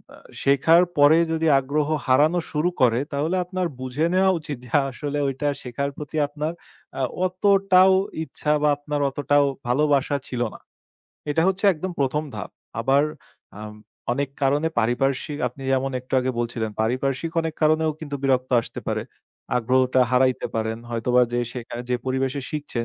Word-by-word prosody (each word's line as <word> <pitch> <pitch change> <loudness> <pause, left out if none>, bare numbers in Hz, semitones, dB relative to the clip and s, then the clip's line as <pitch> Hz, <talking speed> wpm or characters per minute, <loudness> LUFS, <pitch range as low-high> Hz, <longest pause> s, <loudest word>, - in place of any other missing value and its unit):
আ - - -16 0.3
শেখার 150 +5 +5
পরে 145 +3 +6
যদি 160 0 0
আগ্রহ 145 +3 -1 0.2
হারানো 150 +7 +4
শুরু 155 +3 +1
করে 120 -1 +4
তাহলে 155 +6 0
আপনার 185 -1 -2
বুঝে 130 +5 -1
নেওয়া 190 0 +4
উচিত 150 -3 -6
যে 120 - -14 0.2
আসলে 145 +2 -4
ওইটা 135 +2 -2 0.2
শেখার 135 +3 -3
প্রতি 150 +1 -6
আপনার 150 +3 -4 0.5
আ - - 0 0.2
অতটাও 190 0 +4 0.3
ইচ্ছা 150 +1 -3
বা 150 - +3
আপনার 145 0 -3
অতটাও 145 +1 +2 0.2
ভালোবাসা 145 +1 +2
ছিল 125 -1 -3
না। - - -12 0.7
এটা 160 +2 +2
হচ্ছে 195 +2 -2
একদম 180 +4 -5
১ম 140 +2 +1
ধাপ। - - -6 0.3
আবার 135 +4 +3 0.6
আম 105 0 -8 0.4
অনেক 140 +1 -2
কারণে 145 +4 +2
পারিপার্শ্বিক 135 +5 0
আপনি 135 +3 -13
যেমন 135 +1 +1
একটু 125 - -22
আগে 130 +1 -1
বলছিলেন 115 -2 -2
পারিপার্শ্বিক 130 +7 -1
অনেক 160 -1 -3
কারণেও 155 +1 +3
কিন্তু 145 -3 -6
বিরক্ত 130 -2 +1
আসতে - - -8
পারে। - - -1 0.5
আগ্রহটা 130 +2 +2
হারাইতে 130 0 +2
পারেন। 110 0 -2
হয়তোবা 125 +2 +2
যে 120 - +1
শেখায়, 120 -1 -6
যে - - +3
পরিবেশে 130 +1 -1
শিখছেন 145 -6 -3
140 Hz, 155 wpm, -23 LUFS, 130-155 Hz, 0.7 s, পরে